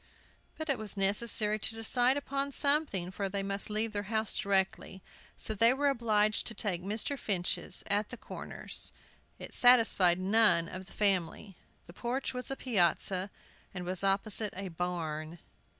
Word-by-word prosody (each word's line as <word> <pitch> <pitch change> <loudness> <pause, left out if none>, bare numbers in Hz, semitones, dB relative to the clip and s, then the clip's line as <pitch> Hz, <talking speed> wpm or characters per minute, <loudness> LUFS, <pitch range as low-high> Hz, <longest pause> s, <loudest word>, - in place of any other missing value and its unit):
But 315 - -5
it 275 -5 0
was 215 -2 -1
necessary 210 +2 +1
to 220 - -1
decide 245 +4 +2
upon 280 0 -3
something, 280 - +3
for 195 0 -4
they 195 0 -3
must 200 +1 -4
leave 215 +1 -1
their 205 - -2
house 220 -1 +1
directly. 190 -1 -1 0.3
So 220 - +1
they 230 +4 +4
were 285 +2 +1
obliged 215 -5 +1
to 230 - -3
take 190 -4 -2
Mr. 215 +8 -2
Finch's, 185 -6 0
at 205 +1 -1
the - - -8
Corners. - - -5 0.5
It - - -8
satisfied 225 -8 +5
none 190 -3 +3
of 185 +2 -9
the - - -17
family. 195 -1 -1 0.3
The 170 - -14
porch 245 +7 -3
was 250 +1 -5
a 270 - -3
piazza, 190 -4 0 0.5
and 180 -1 -5
was 185 +1 -2
opposite 200 +1 +1
a 195 -1 -5
barn. 165 -2 -5
205 Hz, 160 wpm, -30 LUFS, 190-230 Hz, 0.5 s, satisfied